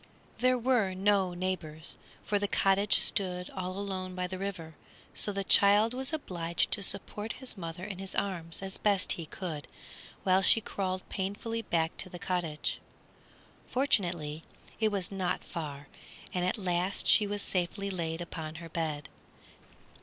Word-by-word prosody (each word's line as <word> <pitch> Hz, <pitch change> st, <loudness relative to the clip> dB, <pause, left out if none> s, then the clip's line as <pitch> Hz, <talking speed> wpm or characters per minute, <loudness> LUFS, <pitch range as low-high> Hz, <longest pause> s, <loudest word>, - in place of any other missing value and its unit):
There 255 Hz, +1 st, +4 dB
were 235 Hz, -6 st, +2 dB
no 190 Hz, -2 st, +2 dB
neighbors, 175 Hz, -4 st, -3 dB, 0.3 s
for 205 Hz, -, +1 dB
the 205 Hz, -, 0 dB
cottage 195 Hz, +1 st, +4 dB
stood 180 Hz, -2 st, +1 dB
all 185 Hz, -1 st, -4 dB
alone 190 Hz, -2 st, -4 dB
by 180 Hz, 0 st, -1 dB
the 185 Hz, +1 st, -5 dB
river, 185 Hz, -5 st, -4 dB, 0.4 s
so 205 Hz, -, +1 dB
the 200 Hz, 0 st, -2 dB
child 205 Hz, +4 st, +6 dB
was 265 Hz, +2 st, -2 dB
obliged 170 Hz, -, 0 dB
to 210 Hz, -, +4 dB
support 205 Hz, +3 st, -1 dB
his 260 Hz, -3 st, -7 dB
mother 170 Hz, -1 st, -6 dB
in 195 Hz, -2 st, -5 dB
his 195 Hz, -1 st, -5 dB
arms 175 Hz, -3 st, -3 dB
as 190 Hz, -1 st, -4 dB
best 200 Hz, -2 st, +2 dB
he 165 Hz, -2 st, +3 dB
could 155 Hz, -6 st, -5 dB, 0.6 s
while 190 Hz, 0 st, +4 dB
she 210 Hz, -, +7 dB
crawled 185 Hz, -3 st, -3 dB
painfully 205 Hz, +4 st, -2 dB
back 165 Hz, -5 st, 0 dB
to 185 Hz, -, -3 dB
the 175 Hz, -, -7 dB
cottage. 170 Hz, -4 st, -2 dB, 0.9 s
Fortunately, 175 Hz, -, +1 dB, 0.4 s
it 220 Hz, -1 st, +3 dB
was 195 Hz, -2 st, -2 dB
not 190 Hz, -2 st, -1 dB
far, 145 Hz, -4 st, -6 dB, 0.5 s
and 180 Hz, -1 st, 0 dB
at 185 Hz, -, 0 dB
last 185 Hz, -1 st, 0 dB
she 210 Hz, -, +7 dB
was 205 Hz, 0 st, -3 dB
safely 195 Hz, +2 st, -1 dB
laid 165 Hz, -2 st, -2 dB
upon 160 Hz, -2 st, -5 dB
her 165 Hz, 0 st, -8 dB
bed. 155 Hz, -3 st, -2 dB
185 Hz, 155 wpm, -31 LUFS, 170-200 Hz, 0.9 s, she